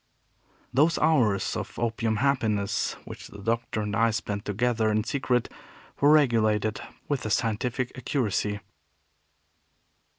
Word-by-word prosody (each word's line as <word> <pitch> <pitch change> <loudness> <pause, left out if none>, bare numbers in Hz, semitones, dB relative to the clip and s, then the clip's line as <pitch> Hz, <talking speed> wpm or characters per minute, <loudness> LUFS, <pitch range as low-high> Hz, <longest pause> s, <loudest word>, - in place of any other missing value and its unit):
Those 155 +6 +4
hours 120 -12 +2
of - - -5
opium 115 -1 0
happiness 110 -5 0
which - - -9
the - - -12
Doctor 115 +1 -2
and 105 -1 -2
I 115 +1 +4
spent 105 -2 -3
together 110 +1 +1
in 110 0 +1
secret 125 -2 0 0.5
were 145 +1 +5
regulated 110 -7 +3 0.3
with 140 -4 -1
a 110 - -3
scientific 120 +3 -1
accuracy. 105 -5 -1
115 Hz, 120 wpm, -27 LUFS, 105-125 Hz, 0.5 s, were